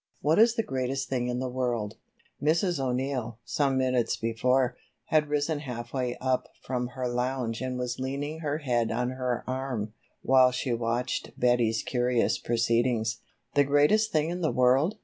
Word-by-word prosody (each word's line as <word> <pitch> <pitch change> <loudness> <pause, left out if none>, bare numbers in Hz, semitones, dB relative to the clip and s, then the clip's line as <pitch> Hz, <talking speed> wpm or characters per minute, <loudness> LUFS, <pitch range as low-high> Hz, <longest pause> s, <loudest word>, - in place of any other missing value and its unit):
What 155 +6 +2
is 230 +1 +6
the 225 - +1
greatest 135 -3 -2
thing 125 -2 -1
in 125 0 -1
the 130 +1 -2
world?" 120 -4 -2 0.4
Mrs. 165 +2 +2
O'Neill, 125 -3 -2
some 140 -2 +1
minutes 130 -2 +1
before, 125 +3 +1 0.3
had 150 -1 +3
risen 150 +1 0
half 125 -5 -6
way 125 -2 -1
up 130 -1 0
from 125 -1 -2
her 130 -1 -1
lounge 125 -1 -2
and 130 -1 -2
was 125 0 -3
leaning 140 +4 -3
her 150 -2 -1
head 120 -6 0
on 125 +2 -1
her 125 -2 -2
arm, 130 -5 -3 0.3
while 130 -1 +6
she 125 0 -2
watched 120 +2 -2
Betty's 120 -2 +2
curious 125 -1 +1
proceedings. 115 -1 +1 0.3
"The 145 - +5
greatest 150 +11 +3
thing 155 +1 +1
in 180 +1 -4
the 160 - +2
world?" 130 +9 +3
130 Hz, 165 wpm, -28 LUFS, 120-140 Hz, 0.4 s, is